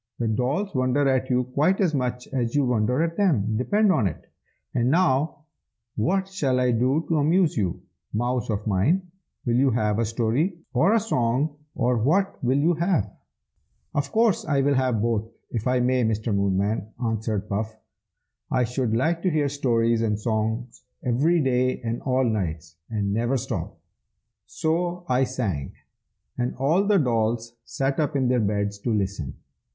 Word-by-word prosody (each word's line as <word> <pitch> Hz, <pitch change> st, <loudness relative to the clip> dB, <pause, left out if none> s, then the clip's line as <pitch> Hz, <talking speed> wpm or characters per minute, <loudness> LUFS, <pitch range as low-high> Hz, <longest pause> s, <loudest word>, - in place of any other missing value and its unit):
"The 120 Hz, -, -1 dB
dolls 135 Hz, -, -1 dB
wonder 130 Hz, +1 st, +2 dB
at 130 Hz, -1 st, +1 dB
you 125 Hz, 0 st, +2 dB
quite 145 Hz, +9 st, +1 dB
as 180 Hz, -6 st, +2 dB
much 125 Hz, -2 st, -2 dB
as 120 Hz, -2 st, -1 dB
you 145 Hz, -2 st, +3 dB
wonder 125 Hz, +4 st, +1 dB
at 165 Hz, 0 st, -3 dB
them, 120 Hz, -, +2 dB
depend 205 Hz, -, +2 dB
upon 110 Hz, -, +2 dB
it! 80 Hz, -, -7 dB, 0.5 s
And 120 Hz, 0 st, +1 dB
now, 150 Hz, -2 st, +1 dB, 0.5 s
what 190 Hz, -, +1 dB
shall 140 Hz, -10 st, 0 dB
I 125 Hz, -1 st, +2 dB
do 130 Hz, +7 st, +1 dB
to 165 Hz, -, +1 dB
amuse 165 Hz, +3 st, +3 dB
you, 95 Hz, -6 st, -2 dB, 0.3 s
mouse 120 Hz, +2 st, -1 dB
of 105 Hz, -1 st, -2 dB
mine? 150 Hz, -, +1 dB, 0.3 s
will 120 Hz, -, +1 dB
you 135 Hz, +1 st, +4 dB
have 110 Hz, -3 st, +1 dB
a 115 Hz, -, +2 dB
story, 120 Hz, -, 0 dB, 0.2 s
or 160 Hz, -, +4 dB
a -, -, +5 dB
song, 140 Hz, -, 0 dB, 0.2 s
or 120 Hz, 0 st, +1 dB
what 175 Hz, -, +1 dB
will 130 Hz, +2 st, +2 dB
you 160 Hz, +5 st, +3 dB
have?" 170 Hz, -, 0 dB, 0.8 s
"Of 140 Hz, -1 st, -1 dB
course 225 Hz, -2 st, +2 dB
I 140 Hz, -3 st, +1 dB
will 140 Hz, +1 st, +2 dB
have 130 Hz, -5 st, +1 dB
both, 115 Hz, -1 st, 0 dB, 0.2 s
if 115 Hz, -1 st, -2 dB
I 125 Hz, 0 st, +2 dB
may, 125 Hz, 0 st, +2 dB
Mr. 110 Hz, 0 st, 0 dB
Moonman!" 100 Hz, +2 st, 0 dB, 0.2 s
answered 110 Hz, -2 st, -2 dB
Puff. 110 Hz, +2 st, -3 dB, 0.7 s
"I 125 Hz, -1 st, +2 dB
should 125 Hz, -1 st, -1 dB
like 165 Hz, +8 st, +1 dB
to 185 Hz, -, +1 dB
hear 150 Hz, -3 st, +1 dB
stories 115 Hz, -5 st, +1 dB
and 105 Hz, -2 st, 0 dB
songs 110 Hz, +2 st, -2 dB, 0.2 s
every 145 Hz, +8 st, +2 dB
days 130 Hz, -1 st, +1 dB
and 115 Hz, 0 st, -3 dB
all 130 Hz, -1 st, +1 dB
nights, 85 Hz, -9 st, -2 dB
and 100 Hz, -3 st, -1 dB
never 120 Hz, +5 st, +1 dB
stop!" 120 Hz, -, -4 dB, 0.7 s
So 175 Hz, -, -1 dB
I 130 Hz, +1 st, +2 dB
sang, 105 Hz, -, -3 dB, 0.7 s
and 125 Hz, 0 st, -1 dB
all 160 Hz, +10 st, +2 dB
the 205 Hz, -1 st, +4 dB
dolls 115 Hz, -, 0 dB
sat 135 Hz, +2 st, -1 dB
up 150 Hz, -1 st, 0 dB
in 130 Hz, -3 st, +2 dB
their 125 Hz, -1 st, +3 dB
beds 100 Hz, -1 st, -1 dB
to 120 Hz, -, -3 dB
listen. 95 Hz, -9 st, -2 dB
125 Hz, 170 wpm, -25 LUFS, 110-145 Hz, 0.8 s, a